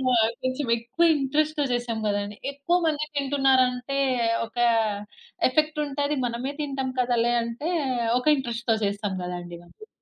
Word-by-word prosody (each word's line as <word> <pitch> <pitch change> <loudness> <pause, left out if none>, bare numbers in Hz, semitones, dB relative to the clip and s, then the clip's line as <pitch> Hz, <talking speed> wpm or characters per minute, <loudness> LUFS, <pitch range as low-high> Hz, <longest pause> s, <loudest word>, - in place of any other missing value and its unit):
ఆహ్, 225 -1 +4
కొంచెం 255 +1 -1
ఎక్కువ 235 +9 +1
ఇంట్రెస్ట్‌తో 295 +2 0
చేసాం 240 -2 -2
కదండీ, 205 0 -2 0.2
ఎక్కువ 285 +6 +1
మంది 305 -1 0
తింటున్నారు 270 -2 +3
అంటే, 250 +2 -4 0.5
ఒక 230 - -19 0.9
ఎఫెక్ట్ 305 +3 +1
ఉంటది. 285 +1 -1
మనమే 245 +4 -3
తింటాం 270 -3 -2
కదలే 240 -1 +2
అంటే, 235 +9 -3 0.5
ఒక 250 - -9
ఇంట్రెస్ట్‌తో 235 -3 -1
చేస్తాం 200 0 -2
కదండీ 175 -1 -6
మనము. 430 - -16
255 Hz, 130 wpm, -25 LUFS, 230-285 Hz, 0.9 s, ఆహ్